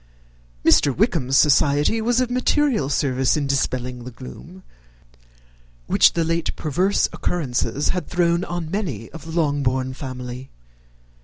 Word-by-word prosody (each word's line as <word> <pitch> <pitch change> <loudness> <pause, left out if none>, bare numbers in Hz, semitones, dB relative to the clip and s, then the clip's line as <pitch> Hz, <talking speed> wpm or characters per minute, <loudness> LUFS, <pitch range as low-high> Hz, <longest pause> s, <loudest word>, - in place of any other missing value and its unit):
Mr. 140 -3 +4
Wickham's 155 - +1
society 150 +7 +3
was 240 +2 +1
of 250 -1 0
material 250 - +1
service 135 -1 +1
in 145 - -1
dispelling 125 -2 -2
the 125 - -7
gloom 80 - -12 1.2
which - - +4
the 170 - 0
late 165 0 -1
perverse 180 +7 +1
occurrences 145 -3 -1
had 180 - -2
thrown 170 0 +1
on 175 -3 -5
many 155 - -4
of 160 -3 -10
the 165 - -8
Longbourn 130 -4 0
family. 130 -1 -7
145 Hz, 130 wpm, -22 LUFS, 130-175 Hz, 1.2 s, Mr